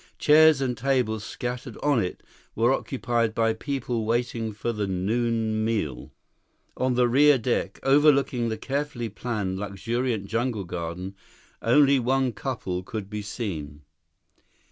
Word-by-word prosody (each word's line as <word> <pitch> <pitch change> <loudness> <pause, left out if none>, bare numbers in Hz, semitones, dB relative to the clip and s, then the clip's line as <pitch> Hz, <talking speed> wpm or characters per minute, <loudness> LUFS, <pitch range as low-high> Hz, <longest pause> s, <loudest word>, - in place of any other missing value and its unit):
Chairs 155 -1 +6
and 125 -2 0
tables 125 -5 0
scattered 125 0 -5
on 145 -4 +3
it 90 - -5 0.3
were 120 +4 +3
occupied 120 -4 -1
by 115 -1 +2
people 120 -1 -3
waiting 115 0 -1
for 110 +3 -3
the 105 -2 -2
noon 110 +3 0
meal. 105 - -2 0.6
On 130 -1 0
the 125 0 +4
rear 140 +3 +5
deck, 120 0 -2
overlooking 135 -4 +3
the 110 - -3
carefully 135 -1 -3
planned, 100 -4 -3
luxuriant 110 +2 -2
jungle 115 0 -1
garden, 90 +2 -5 0.5
only 140 +3 +5
one 130 +1 +1
couple 105 -6 -4
could 100 +1 -6
be 105 0 -3
seen. 80 - -5
115 Hz, 130 wpm, -26 LUFS, 105-130 Hz, 0.6 s, Chairs